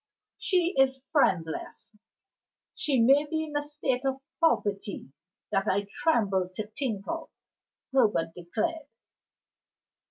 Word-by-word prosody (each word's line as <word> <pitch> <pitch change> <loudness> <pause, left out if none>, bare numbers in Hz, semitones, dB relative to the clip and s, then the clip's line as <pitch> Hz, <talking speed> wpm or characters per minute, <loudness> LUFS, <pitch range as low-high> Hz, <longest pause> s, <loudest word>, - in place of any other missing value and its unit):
"She 360 -1 +2
is 265 -1 +3
friendless; 215 - 0 0.8
she 275 -4 0
may 275 +6 +5
be 315 +1 -1
in 300 -2 -7
a 290 - +2
state 290 -3 -2
of 270 0 0 0.2
poverty 205 - 0 0.4
that 195 - +1
I 200 +2 +1
tremble 200 - +1
to 215 - -3
think 220 -4 -3
of," 330 0 -4 0.6
Herbert 210 -11 +3
declared. 290 - -3
265 Hz, 115 wpm, -28 LUFS, 200-300 Hz, 0.8 s, may